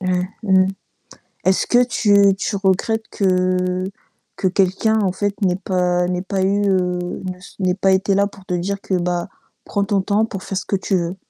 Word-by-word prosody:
Mmh, 180 -1 0 0.2
mmh. 190 -2 +4 0.8
Est-ce 190 0 +2
que 245 +1 +4
tu 200 -4 +4
tu 200 +1 -2
regrettes 195 +3 0
que 185 -1 +1 0.5
que 190 - +1
quelqu'un 195 +4 +2
en 185 -2 +1
fait, 205 +1 -1
n'ait 180 -2 +2
pas 180 -2 0
n'ait 180 0 -1
pas 190 0 -2
eu, 200 +2 +2
heu, 180 -1 -1
ne 185 0 -4
s 180 - -15
n'ait 180 -1 +2
pas 195 0 +2
été 190 +1 +2
là 200 +1 +3
pour 195 -1 -11
te 180 - -2
dire 195 +3 -2
que, 190 - -3
bah: 175 0 -1 0.4
«Prends 200 -1 -1
ton 200 -1 +1
temps 205 +2 +1
pour 195 -4 -7
faire 195 - -3
ce 200 - -7
que - - -2
tu 190 0 -1
veux»? 175 +1 -2
190 Hz, 200 wpm, -20 LUFS, 180-200 Hz, 0.8 s, mmh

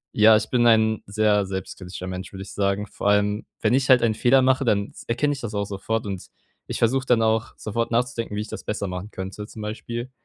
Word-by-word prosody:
Ja, 110 +1 +7
ich 110 - 0
bin 120 -1 +2
ein 110 -1 +4
sehr 105 -1 +2
selbstkritischer 95 -1 -6
Mensch, 95 +1 -6
würde 95 - -7
ich 95 - -8
sagen. 100 +1 0
Vor - - -4
allem, 105 +1 +2 0.2
wenn - - +3
ich 135 0 +1
halt 125 -2 +7
einen 110 -2 +2
Fehler 130 +3 +4
mache, 130 +1 +2
dann 100 -3 +1 0.2
erkenne 145 +5 +1
ich 135 - -7
das 110 -2 -5
auch 100 0 -1
sofort. 105 +2 -3
Und 95 -2 -5 0.4
ich - - -4
versuche 130 +3 +2
dann 120 -3 +3
auch 110 0 +1
sofort 115 +2 -2
nachzudenken, 115 -2 -1
wie 105 - -1
ich 105 - -6
das - - -7
besser 105 -2 -3
machen 90 +3 -6
könnte 95 +2 -6
zum 110 - -10
Beispiel. 120 +3 -5
110 Hz, 230 wpm, -24 LUFS, 100-115 Hz, 0.4 s, Ja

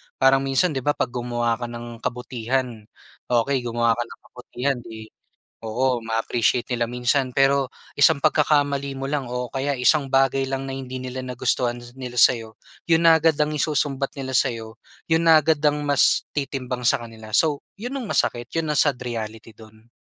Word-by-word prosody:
Parang 135 0 +4
minsan 135 +6 +1
'di 135 - -2
ba, 145 +3 0
'pag - - -2
gumawa 120 -1 -1
ka 120 - -3
ng 120 0 -8
kabutihan, 125 -2 -3 0.4
okey 125 +3 +1
gumawa 115 0 +1
ka 120 - -1
ng - - -13
kabutihan 125 +2 -3
'di, 110 -2 -10 0.5
oo 125 +3 0
ma-appreciate 115 +2 0
nila 120 -1 0
minsan. 125 +2 0
Pero 135 0 +3 0.3
isang 145 -1 +5
pagkakamali 145 -3 +2
mo 135 0 -5
lang 145 -3 -1
o 125 0 -4
kaya 140 +1 -1
isang 135 +3 +3
bagay 135 0 +2
lang 135 0 -3
na - - -5
hindi 130 -1 -6
nila 130 0 -6
nagustuhan 125 -1 -1 0.2
nila 125 -2 -7
sa'yo, 115 -3 +3 0.3
'yon 165 -1 +3
na 165 - +7
agad 160 0 +3
ang 150 0 +2
isusumbat 140 -2 0
nila 130 -1 -4
sa'yo, 110 -2 -1 0.3
'yon 165 +1 +3
na 160 -1 +7
agad 160 +1 +2
ang 150 0 +3
mas 145 - +3
titimbang 130 -3 -3
sa - - +3
kanila. 110 -2 -11
So, 150 -3 +2 0.2
'yon 245 +4 -5
ang 255 - -5
masakit, 120 0 0
'yon 165 -1 -1
ang 150 - +1
sad 140 -5 +3
reality 115 -2 -6
do'n. 110 0 -17
130 Hz, 175 wpm, -23 LUFS, 120-140 Hz, 0.5 s, na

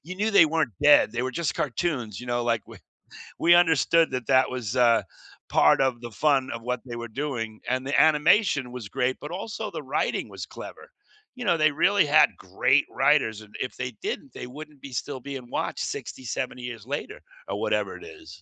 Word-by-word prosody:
you 180 +5 -7
knew 210 +3 0
they 185 -6 +7
weren't 160 -5 0
dead, 145 -6 +6
they 120 - -2
were 130 - -2
just 165 +5 -2
cartoons, 125 - -2
you 125 - -9
know, 120 0 -1
like, 115 -2 0
we - - -13 0.6
we 170 - +5
understood 165 -1 +4
that 125 -2 -3
that 130 -1 +4
was, 125 -3 -4
uh, 120 -2 +4 0.5
part 75 - +4
of 125 -3 0
the 120 - -7
fun 135 +2 +1
of 115 - -5
what 125 0 -2
they 120 -2 -7
were 120 0 -6
doing, 115 -4 -4
and 130 +1 -1
the 140 - +1
animation 155 - +3
was 120 -5 -7
great, 130 +2 0
but 150 - -7
also 200 +4 -5
the - - -6
writing - - -1
was - - -7
clever. - - -10 0.5
You 250 -2 -6
know, 170 -3 +3
they 155 0 +4
really 195 +5 +3
had 150 +1 +5
great - - +2
writers 110 -1 +2
and 105 -1 -16
if 125 - -4
they 125 0 -3
didn't, 135 - -5
they - - -7
wouldn't 150 +1 -11
be 135 - -9
still 130 +2 -4
being 130 -2 -8
watched - - -3
60, 130 - -5
70 125 +1 -4
years 120 -3 -7
later 145 +2 -5 0.3
or - - -3
whatever - - -1
it - - -14
is. 405 -7 -13
130 Hz, 210 wpm, -25 LUFS, 120-155 Hz, 0.6 s, they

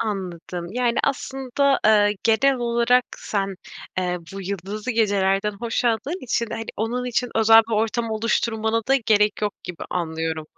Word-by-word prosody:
Anladım. 180 -5 -4
Yani, 245 -1 +1
aslında, 270 0 0
eee, 210 -1 +4
genel 265 +5 +3
olarak 235 +1 +2
sen, 195 -2 -2 0.4
eee, 180 -1 -1 0.2
bu 195 - -5
yıldızlı 200 +5 -4
gecelerden 200 -2 +1
hoşladığın 240 +7 -1
için, 235 -1 0
hani, 225 - -4
onun 240 +3 -2
için 245 0 0
özel 225 0 +7
bir - - -4
ortam 225 +1 0
oluşturmana 220 0 0
da 270 - +5
gerek 210 -1 +3
yok 205 -1 0
gibi 180 -2 -7
anlıyorum. 160 -2 -3
220 Hz, 140 wpm, -23 LUFS, 195-235 Hz, 0.4 s, özel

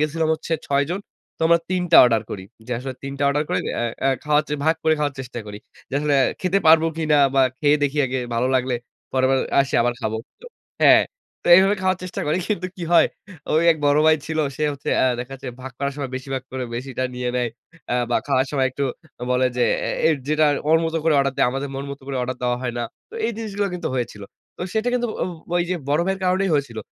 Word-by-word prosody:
গেছিলাম 155 +1 0
হচ্ছে 165 - -6 0.2
৬ 140 0 +2
জন। 185 +3 -2 0.4
তো - - -37
আমরা 170 +1 +5
৩ 185 -1 +1
টা - - +9
অর্ডার 115 -3 +2
করি। 95 -2 -6 0.2
যে 125 - -4
আসলে 130 +1 -6
৩ 135 0 -5
টা 145 - -1
অর্ডার 145 +2 +1
করে - - +1 0.2
এ্যা 120 - -1 0.2
এ - - +4 0.2
খাওয়ার 150 0 +3
যে 150 - -1
ভাগ 160 +1 +4
করে 160 - +4
খাওয়ার 145 -2 -1
চেষ্টা 125 -2 -7
করি। 105 0 -7 0.3
যে - - -6
আসলে 150 -1 +1 0.3
খেতে 185 +1 +2
পারবো 160 +1 +7
কিনা 155 -2 +2 0.2
বা 135 - +5 0.2
খেয়ে 145 0 +4
দেখি 145 +1 0
আগে 130 +1 -2 0.2
ভালো 125 +2 +1
লাগলে, 125 0 0 0.4
পরের 130 0 +2
বার 135 - +3 0.2
আসি 135 - -1
আবার 120 0 0
খাবো। 110 -1 -2 0.6
হ্যাঁ। - - +8 0.4
তো - - -11
এইভাবে 195 +2 +4
খাওয়ার 185 -1 +1
চেষ্টা 185 - -5
করি। 155 +4 +1
কিন্তু 185 -4 -1
কি 180 - -7
হয় 170 - +7 0.5
ওই 155 +2 +3
এক - - -7
বড় 145 +1 +4
ভাই 155 0 +6
ছিল। 160 0 -3 0.2
সে 155 - -3
হচ্ছে 140 - -5
আ - - +4
দেখা 125 +2 -6
যাচ্ছে 135 -1 -8
ভাগ 130 0 -7
করার 140 0 -1
সময় 140 -3 -4
বেশিভাগ 130 0 -4
করে 130 -1 -3
বেশিটা 130 +1 -3
নিয়ে 125 0 -2
নেয়। 120 -1 0 0.4
আ - - +2 0.2
বা - - +3
খাওয়ার 135 -2 +2
সময় 135 -3 +1
একটু 140 +2 -2 0.5
বলে 125 0 +3
যে 125 - +3 0.2
এ - - 0 0.2
এ - - +6 0.2
যেটা 155 0 +3 0.2
ওর 160 +1 +6
মত 160 - -2
করে 160 -2 +3
অর্ডার 135 -1 +1
দেয়, - - +3
আমাদের 135 +2 -3
মন 135 +1 -4
মত 140 - -7
করে 140 -1 -3
অর্ডার 130 +1 -3
দেওয়া 125 0 +1
হয় 120 -1 -3
না। 120 - -1 0.3
তো - - -13
এই - - 0
জিনিসগুলো 205 -3 -2
কিন্তু 175 - -3
হয়েছিল। 120 -5 -3 0.3
তো - - -14
সেটা 220 +2 +1
কিন্তু 245 -1 +1 0.2
ও - - +2 0.3
ওই 175 - +3
যে 185 - +1
বড় 145 +3 +2
ভাইয়ের 190 0 -1
কারণেই 185 +1 +1
হয়েছিল। 135 -6 -1
140 Hz, 235 wpm, -22 LUFS, 130-160 Hz, 0.6 s, টা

